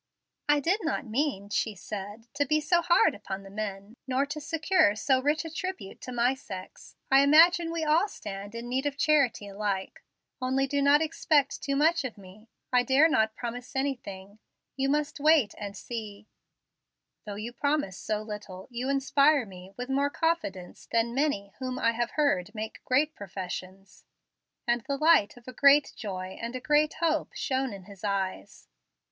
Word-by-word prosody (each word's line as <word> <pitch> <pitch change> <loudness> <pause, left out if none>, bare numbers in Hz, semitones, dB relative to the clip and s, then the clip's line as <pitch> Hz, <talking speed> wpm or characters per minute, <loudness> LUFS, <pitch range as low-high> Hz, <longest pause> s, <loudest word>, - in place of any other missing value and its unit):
"I 295 0 +5
did 355 +9 +1
not 320 -3 -1
mean," 225 -4 -1
she 210 0 -1
said, 205 +3 -7
"to 285 +1 +1
be 305 +2 +2
so 340 +3 +2
hard 345 0 +4
upon 195 -1 -6
the 195 - -12
men, 205 +1 -5
nor 265 +2 +1
to 295 +2 -6
secure 325 - +2
so 260 +4 +2
rich 295 +4 +1
a 325 - -6
tribute 370 - -5
to 255 - -7
my 245 +1 +2
sex. 190 -8 -10 0.2
I 270 - +7
imagine 330 +4 +6
we 335 -1 -2
all 315 +6 +3
stand 205 - -8
in 235 +1 -6
need 260 +3 -1
of 280 -1 -4
charity 280 -9 +2
alike. 200 -1 -3 0.4
Only 260 +1 +1
do 280 +1 -1
not 285 +2 +5
expect 300 -3 +1
too 275 -1 -1
much 320 +3 +3
of 250 -5 -5
me. 200 +3 -15 0.2
I 250 - +6
dare 270 +5 +5
not 220 -8 +1
promise 245 +2 -6
anything. 215 -7 -4 0.4
You 270 +1 0
must 295 +1 0
wait 295 -7 +4
and 205 -1 -7
see." 215 -3 -7 1.0
"Though 205 - -5
you 220 +4 -6
promise 285 -6 0
so 215 -1 -2
little, 210 -3 -8
you 245 +2 -3
inspire 275 0 +3
me 185 -1 -12
with 250 0 -4
more 275 +2 +1
confidence 285 - -2
than 230 0 +1
many 245 -8 -1
whom 255 -1 -3
I 230 - +2
have 235 +1 -1
heard 215 -9 +1
make 215 0 -6
great 290 +4 +2
professions"; 190 -1 -8 0.6
and 240 0 +1
the 275 +4 -3
light 305 -9 +4
of 245 - -17
a 255 - -7
great 280 +2 +5
joy 185 -3 -6
and 235 +2 -4
a - - -2
great 300 +3 +2
hope 315 -2 0
shone 265 -1 -1
in 195 -2 -9
his 200 0 -14
eyes. 195 - -3
255 Hz, 175 wpm, -28 LUFS, 205-290 Hz, 1.0 s, I